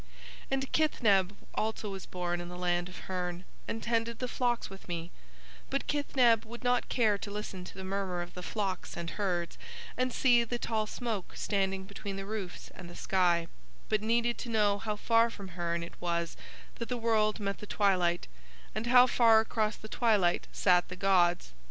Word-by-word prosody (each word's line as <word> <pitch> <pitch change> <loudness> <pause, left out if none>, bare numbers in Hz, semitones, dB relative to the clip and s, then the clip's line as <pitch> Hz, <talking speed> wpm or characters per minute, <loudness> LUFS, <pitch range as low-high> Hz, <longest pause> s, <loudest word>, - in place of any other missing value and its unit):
"And 270 0 -1
Kithneb 210 - +3 0.2
also 215 -1 -2
was 195 -1 -7
born 175 -1 -2
in 175 - -7
the 180 - -7
land 175 0 0
of 180 - -10
Hurn 180 -1 -4 0.2
and 225 - -3
tended 230 -1 0
the 250 - -2
flocks 245 -1 0
with 195 0 -12
me, 170 -1 -4 0.6
but - - -1
Kithneb 255 -6 +3
would 235 +2 -10
not 245 0 +2
care 215 -5 +2
to 205 - -5
listen 200 -3 -5
to - - -10
the 190 - -7
murmur 190 -2 -2
of 175 - -11
the 180 - -7
flocks 190 -2 -3
and 170 -1 -4
herds 180 -4 -2 0.4
and 255 0 0
see 240 -1 +4
the 240 +1 -3
tall 220 -2 -1
smoke 220 -5 -4
standing 195 -2 0
between 200 0 -6
the 195 0 -5
roofs 200 -4 -5
and 180 -2 -10
the 175 - -11
sky, 175 -3 +2 0.4
but 215 -1 +2
needed 235 +2 +1
to 240 - -5
know 205 -3 +3
how 215 -1 -2
far 230 +2 +3
from 200 -4 -9
Hurn 170 -1 -2
it 170 - -8
was 170 -1 -1 0.4
that 235 - -4
the 250 - -1
world 220 -2 +2
met 200 -1 -2
the 210 - -8
twilight, 180 -5 +2 0.5
and 225 - -3
how 250 +1 +8
far 230 -3 +6
across 220 -1 0
the 215 - -10
twilight 210 -7 +2
sat 180 -1 +3
the 180 - -7
gods. 175 - +2
200 Hz, 190 wpm, -31 LUFS, 180-230 Hz, 0.6 s, how